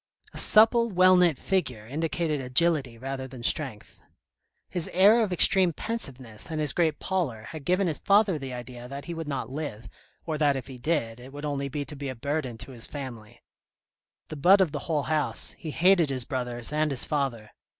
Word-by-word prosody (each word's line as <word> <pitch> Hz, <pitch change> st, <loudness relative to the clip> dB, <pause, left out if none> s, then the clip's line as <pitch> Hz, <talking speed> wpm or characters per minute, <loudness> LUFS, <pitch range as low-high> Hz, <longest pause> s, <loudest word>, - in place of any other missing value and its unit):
A -, -, -3 dB
supple 230 Hz, +2 st, +5 dB
well 185 Hz, -1 st, +5 dB
knit 175 Hz, -5 st, +4 dB
figure, 125 Hz, -, -2 dB
indicated 155 Hz, +2 st, -2 dB
agility 135 Hz, -1 st, +1 dB
rather 130 Hz, +1 st, -5 dB
than 130 Hz, -2 st, -10 dB
strength. 130 Hz, -7 st, -4 dB, 0.7 s
His 175 Hz, -3 st, -2 dB
air 205 Hz, +6 st, +6 dB
of 210 Hz, -4 st, 0 dB
extreme 180 Hz, 0 st, +4 dB
pensiveness 130 Hz, -, -4 dB
and 160 Hz, -1 st, -3 dB
his 150 Hz, -2 st, +1 dB
great 160 Hz, -3 st, +1 dB
pallor 160 Hz, -, -2 dB
had 155 Hz, +3 st, -9 dB
given 185 Hz, +4 st, +2 dB
his 160 Hz, -4 st, 0 dB
father 200 Hz, -5 st, +3 dB
the 135 Hz, -2 st, -6 dB
idea 125 Hz, 0 st, -8 dB
that 140 Hz, +2 st, -7 dB
he 170 Hz, -, -5 dB
would 165 Hz, -2 st, -6 dB
not 140 Hz, -3 st, -4 dB
live, 140 Hz, -6 st, -5 dB, 0.4 s
or 155 Hz, -2 st, -3 dB
that 145 Hz, -2 st, +3 dB
if 130 Hz, -3 st, -4 dB
he 130 Hz, -2 st, -10 dB
did, 120 Hz, -5 st, -1 dB
it 130 Hz, +2 st, -12 dB
would 145 Hz, +1 st, -7 dB
only 140 Hz, -1 st, -2 dB
be 145 Hz, +1 st, -4 dB
to 150 Hz, -, -9 dB
be 140 Hz, -1 st, -5 dB
a 130 Hz, -, -5 dB
burden 135 Hz, -1 st, -3 dB
to 120 Hz, +4 st, -4 dB
his 120 Hz, -3 st, -5 dB
family. 120 Hz, -7 st, -9 dB, 0.9 s
The 155 Hz, -, -6 dB
butt 185 Hz, +8 st, +6 dB
of 185 Hz, -5 st, +2 dB
the 145 Hz, -, -3 dB
whole 150 Hz, -3 st, +1 dB
house, 150 Hz, -7 st, 0 dB
he 160 Hz, -, -6 dB
hated 175 Hz, 0 st, +4 dB
his 130 Hz, -3 st, -1 dB
brothers 125 Hz, -1 st, -4 dB
and 155 Hz, 0 st, +1 dB
his 135 Hz, -4 st, -1 dB
father. 135 Hz, -8 st, -2 dB
145 Hz, 200 wpm, -27 LUFS, 130-170 Hz, 0.9 s, air